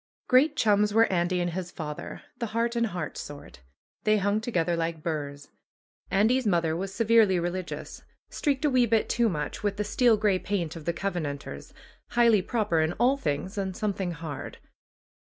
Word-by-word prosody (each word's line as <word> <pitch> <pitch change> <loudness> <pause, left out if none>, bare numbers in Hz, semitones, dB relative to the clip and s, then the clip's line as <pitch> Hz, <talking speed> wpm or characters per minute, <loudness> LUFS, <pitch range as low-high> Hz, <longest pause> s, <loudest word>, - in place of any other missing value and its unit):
Great 265 +5 +4
chums 210 -1 +2
were 225 0 +7
Andy 180 +1 +1
and 175 0 -1
his 180 0 -4
father, 150 -4 -7 0.2
the 235 - -2
heart 235 +1 +1
in 235 0 +2
heart 180 -7 -4
sort. 145 - -9 0.4
They 215 0 +3
hung 205 +2 +1
together 175 -7 0
like 165 -1 -3
burrs. 145 -3 -4 0.6
Andy's 225 +5 +2
mother 170 -4 +2
was 190 +3 -3
severely 220 -3 +4
religious, 175 +1 -4 0.3
streaked 285 -1 -1
a - - +4
wee 250 -2 +4
bit 225 0 +2
too 235 -1 +2
much 150 -5 -4
with 205 -1 -1
the 210 - 0
steel 235 +1 +3
gray 205 -3 +2
paint 175 -6 -2
of 160 -2 -9
the 170 - 0
Covenanters, 165 -6 -4 0.4
highly 235 -4 +5
proper 210 -5 0
in 160 +2 0
all 245 +7 +3
things 190 - -3
and 190 -2 -3
something 195 -4 -2
hard. 155 -3 -7
195 Hz, 175 wpm, -27 LUFS, 170-225 Hz, 0.6 s, were